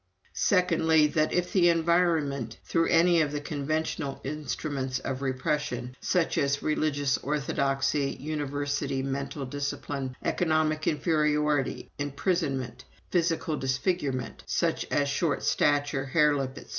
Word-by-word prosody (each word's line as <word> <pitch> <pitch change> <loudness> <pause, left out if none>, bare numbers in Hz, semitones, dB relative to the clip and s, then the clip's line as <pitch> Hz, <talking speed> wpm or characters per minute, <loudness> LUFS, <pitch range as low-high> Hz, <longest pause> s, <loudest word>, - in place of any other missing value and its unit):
"Secondly, 160 -4 +3
that 155 +1 +1
if 180 0 -1
the 175 -3 +5
environment 160 -8 +1
through 165 -1 +1
any 170 0 +4
of 150 -2 0
the 145 - -2
conventional 145 0 -2
instruments 135 -2 -3
of 130 0 -4
repression, 130 -1 -2
such 180 -3 +1
as 140 0 0
religious 145 -3 +1
orthodoxy, 140 -1 0
university 145 -1 -2
mental 135 +1 -3
discipline, 140 -1 -4
economic 155 -2 +1
inferiority, 150 -2 +1
imprisonment, 145 -2 -1 0.3
physical 165 -2 +1
disfigurement, 135 0 -1
such - - 0
as 145 -1 +1
short 145 0 0
stature, 145 -1 +1
hare 150 +1 +3
lip, 135 -2 -2
etc. - - -11
145 Hz, 115 wpm, -28 LUFS, 135-155 Hz, 0.3 s, the